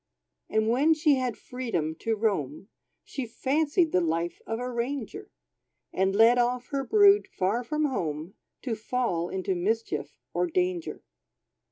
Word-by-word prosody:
And 220 0 +1
when 280 +8 +4
she 305 -1 +3
had 250 -3 -2
freedom 225 -12 -3
to 225 -1 0
roam, 195 - -2 0.3
She 265 -4 -5
fancied 305 - +1
the 180 - +3
life 170 +1 -1
of 225 - -2
a 250 +1 -4
ranger; 265 - -4 0.6
And 190 +1 +1
led 230 +3 +6
off 245 +1 0
her 275 -2 -1
brood, 410 +4 +5
far 225 - -1
from 300 +5 -1
home, 165 - -3 0.3
To 245 - -2
fall 215 -6 -1
into 190 0 -2
mischief 220 +6 -2 0.2
or 360 - +1
danger. 360 0 -2
240 Hz, 145 wpm, -27 LUFS, 195-285 Hz, 0.6 s, led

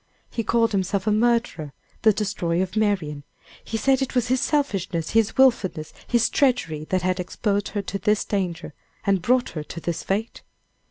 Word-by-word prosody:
He 230 - -2
called 230 0 +2
himself 195 0 -1
a 215 - +2
murderer, 215 -9 +1 0.3
the 220 - +6
destroyer 190 -4 -1
of 190 +2 -6
Marian; 185 -9 0 0.4
he 225 - -3
said 265 +4 +2
it 265 0 -2
was 245 -1 +1
his 255 0 +2
selfishness, 195 - -1
his 225 -1 +2
willfulness, 210 -12 +2
his 235 -2 +3
treachery, 235 - +1
that 185 -2 0
had 185 0 0
exposed 200 +2 -1
her 205 -2 -3
to 195 +1 -4
this 210 +1 +1
danger, 180 -4 -3 0.3
and 195 -2 +2
brought 250 +6 +2
her 155 - -5
to 160 +3 -8
this 170 0 -3
fate! 210 +4 -3
205 Hz, 175 wpm, -24 LUFS, 180-230 Hz, 0.4 s, the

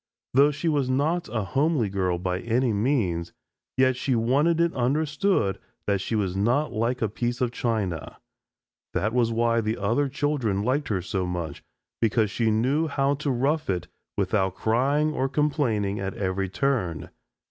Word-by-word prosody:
Though 140 +3 +6
she 150 +3 -3
was 145 -5 +1
not 155 +7 0
a 110 -3 -1
homely 140 - +1
girl 95 -2 0
by 90 +1 -2
any 120 +2 +1
means, 100 -7 0 0.4
yet 130 0 +4
she 125 +1 0
wanted 140 +9 +2
it 170 0 +2
understood 145 - +1 0.3
that 100 -2 +1
she 110 - -2
was 95 -4 0
not 120 +10 +1
like 115 +2 0
a - - +2
piece 120 +3 -2
of 125 -2 0
china. 105 -10 -2 0.8
That 110 +3 0
was 120 -2 +2
why 115 0 +2
the 110 +1 -1
other 120 +8 +1
children 130 -8 0
liked 140 +6 0
her 95 -4 -1
so 90 +1 -2
much 85 -5 -4 0.4
because 110 -2 +2
she 115 0 +1
knew 130 +9 +2
how 140 -1 +1
to 145 +1 -3
rough 140 +4 0
it 90 -3 -1 0.3
without 95 -1 +1
crying 140 +7 +1
or 135 -2 0
complaining 130 -9 0
at 95 0 -3
every 95 0 -1
turn. 100 - -1
120 Hz, 165 wpm, -25 LUFS, 100-140 Hz, 0.8 s, Though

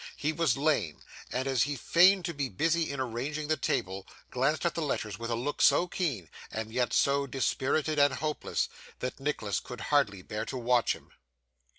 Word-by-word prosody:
He 150 +2 -1
was 160 -7 +1
lame; 135 - +1 0.3
and 130 +2 -1
as 135 -3 +2
he 145 +3 +1
feigned 180 - +5
to 170 - -2
be 140 -3 -2
busy 165 - +1
in 140 -1 -4
arranging 135 +5 -3
the 155 - +3
table, 95 -8 -2 0.2
glanced 140 +7 +1
at 170 - +2
the 165 - -3
letters 105 - -2
with 115 0 -4
a 115 - 0
look 135 +6 -3
so 175 - +5
keen, 140 - -2 0.2
and 110 0 -4
yet 125 0 +1
so 140 0 +2
dispirited 140 +3 0
and 145 -1 +4
hopeless, 150 +2 -1 0.3
that 125 +1 -4
Nicholas 135 -8 -1
could 125 -2 -9
hardly 105 -10 +2
bear 105 +3 -4
to 130 - -5
watch 120 -1 +2
him. - - -17
135 Hz, 190 wpm, -30 LUFS, 115-150 Hz, 0.3 s, feigned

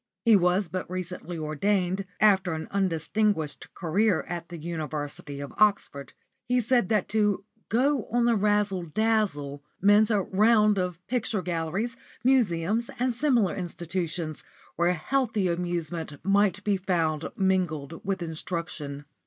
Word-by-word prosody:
He 230 -2 +7
was 180 +1 +3
but 185 +1 -5
recently 180 -1 -4
ordained, 180 +5 0
after 190 -4 +4
an 160 0 -5
undistinguished 185 -2 0
career 195 +5 +1
at 170 -1 -5
the 175 - -7
University 150 -3 -5
of 140 -1 -7
Oxford. 200 -9 +1 0.3
He 250 0 +2
said 240 -3 +2
that 210 -4 +1
to 210 -2 +1 0.2
"go 260 +2 +2
on 240 0 +2
the 235 -1 +4
razzle 205 -2 +1
dazzle" 170 -7 -1 0.2
meant 205 +2 +5
a 205 -4 +2
round 210 +1 +4
of 180 -1 -3
picture 230 -5 -1
galleries, 180 +8 -2 0.3
museums, 225 -4 +2
and 250 0 +1
similar 240 -7 +2
institutions, 170 -2 -4 0.3
where 175 +1 +2
healthy 220 - 0
amusement 170 -2 -2
might 200 0 +2
be 205 -1 +1
found 165 -5 0
mingled 175 -6 -1
with 190 -2 -2
instruction. 160 -3 -4
185 Hz, 130 wpm, -27 LUFS, 165-210 Hz, 0.3 s, He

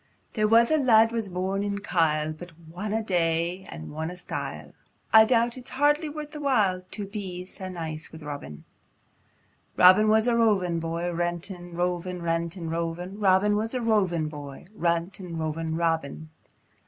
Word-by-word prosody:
There 215 -2 +2
was 230 +3 +5
a 315 - +4
lad 225 -5 +5
was 225 -4 -1
born 190 +2 -2
in 200 0 -2
Kyle, 155 -6 0
But 175 +2 -11
whatna 210 +7 -3
day 170 0 0
o' - - -7
whatna 160 - -6
style, - - -5 0.4
I 220 0 +9
doubt 235 +1 +1
it's 250 - -11
hardly 295 +4 +2
worth 300 0 -7
the 300 - -7
while 210 -10 +2
To 205 - -5
be 190 -3 -6
sae 190 0 -7
nice 160 -3 -6
wi' 160 - -10
Robin. 140 - -7 1.1
Chor. - - +4
Robin 195 +4 +8
was 220 +2 +4
a 240 - +3
rovin' 195 -7 +2
boy, 165 +2 -2
Rantin', 175 +1 -4
rovin', 180 +1 -2
rantin', 165 0 -2
rovin', 170 +4 -4
Robin 200 +1 +3
was 225 +4 -1
a - - 0
rovin' 190 -8 +1
boy, 145 -1 -9
Rantin', 170 -1 -2
rovin', 160 0 -2
Robin! 160 -2 -2
180 Hz, 160 wpm, -26 LUFS, 165-215 Hz, 1.1 s, I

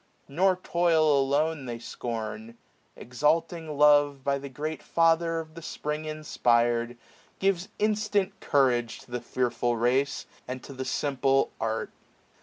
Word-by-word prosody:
Nor 185 +6 +2
toil 165 -3 +3
alone 145 +1 0
they 120 -1 -4
scorn: 115 -1 -6 0.4
Exahing 155 +4 -1
love. 145 -2 +5
By 140 0 0
the 140 0 -8
great 150 +4 -5
Father 165 0 +2
of 155 -1 -8
the 165 - -9
Spring 150 0 -4
inspir'd, 120 -6 +1
685^ - - -24 0.4
Gives 195 0 0
instant 210 -2 0
courage 125 -4 +1
to - - -18
the 120 0 -3
fearful 120 -1 -1
race. 130 +4 +1 0.2
And 130 0 -6
to 140 - -9
the 130 0 -5
simple, 135 0 +1
art. 110 0 -2
140 Hz, 135 wpm, -27 LUFS, 125-160 Hz, 0.4 s, love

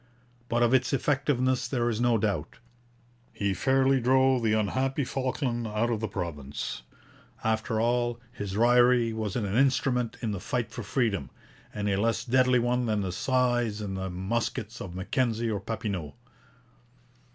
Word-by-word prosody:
But 120 +1 +2
of 120 +1 +3
its 130 +1 +2
effectiveness 135 -2 +1
there 120 -3 0
is 115 -1 -1
no 120 -1 +3
doubt. 100 -8 -2 0.7
He 100 -1 -1
fairly 135 +6 +2
drove 130 +1 +4
the 110 -2 +2
unhappy 130 +7 0
Falkland 125 -3 -2
out 110 +3 0
of 115 - -1
the 110 - -2
province. 75 -11 -5 0.6
After 110 0 0
all, 120 +1 +1
his 100 -5 -5
raillery 120 0 +4
was 110 -3 -3
an 115 - -1
instrument 125 +2 +1
in 110 - 0
the 100 - -3
fight 115 +4 -2
for 120 - -6
freedom, 100 - -1 0.4
and 105 0 -3
a 100 0 +1
less 115 +1 0
deadly 130 0 +4
one 120 0 +1
than 105 -2 +1
the 95 -2 -2
scythes 120 0 +1
and 100 -2 -4 0.2
muskets 110 +3 -3
of 90 -3 -7
Mackenzie 115 +3 0
or 105 - -1
Papineau. 100 -7 -4
115 Hz, 150 wpm, -28 LUFS, 105-125 Hz, 0.7 s, drove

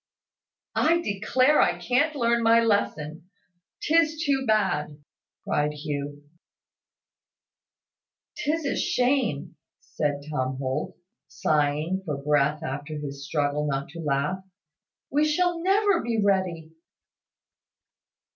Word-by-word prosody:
"I 335 +2 +3
declare 255 - +2
I 175 -1 +2
can't 255 - +1
learn 235 -3 +2
my 230 0 +5
lesson 170 -7 -1 0.5
'tis 320 0 +2
too 270 -2 +1
bad!" 150 -9 +1 0.5
cried 150 0 0
Hugh. 145 -1 -5 2.1
"'Tis 310 +1 -1
a 280 - 0
shame!" 250 - 0 0.2
said 145 -1 -3
Tom 130 -3 -2
Holt, 130 -1 -3 0.3
sighing 155 +5 0
for 150 -6 -3
breath 150 +1 +1
after 145 +3 -5
his 140 -1 -6
struggle 150 0 0
not 135 -1 -2
to 170 +4 -10
laugh. 150 +4 -1 0.7
"We 295 +2 +3
shall 340 +3 +1
never 390 0 +3
be 230 -1 -1
ready." 185 -5 0
175 Hz, 105 wpm, -26 LUFS, -, 2.1 s, my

